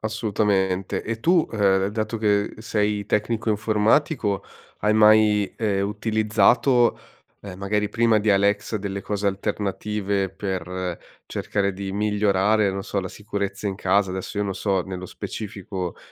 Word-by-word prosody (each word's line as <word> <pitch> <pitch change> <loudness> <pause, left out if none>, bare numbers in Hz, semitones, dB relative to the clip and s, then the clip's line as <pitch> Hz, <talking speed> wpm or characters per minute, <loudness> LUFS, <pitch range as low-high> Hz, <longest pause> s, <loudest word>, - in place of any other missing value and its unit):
Assolutamente. 100 -3 0
E 115 0 -4
tu, 170 +6 +3
ehm, 95 -3 +2
dato 110 +1 -3
che 105 -1 +1
sei 105 -2 -1
tecnico 110 +2 -1
informatico, 110 - +1 0.4
hai 105 +1 +2
mai, 105 -1 +5
ehm, 100 -3 0
utilizzato, 110 +3 +2 0.4
ehm, 95 -2 -9
magari 105 +1 0
prima 115 -1 +3
di 105 0 +1
Alexa 100 +2 +2
delle 100 -1 -4
cose 100 +1 -3
alternative 100 0 -1
per 95 -2 -4 0.3
cercare 100 -1 -1
di 95 +1 -5
migliorare, 105 0 +2
non 95 0 -4
so, 100 - -2
la 95 - -5
sicurezza 100 0 -4
in 95 -1 -2
casa, 95 0 +2
adesso 95 +2 -5
io 105 - +1
non 100 -1 -3
so 95 -2 0
nello 90 0 -6
specifico, 95 -3 -6
105 Hz, 140 wpm, -23 LUFS, 95-110 Hz, 0.4 s, mai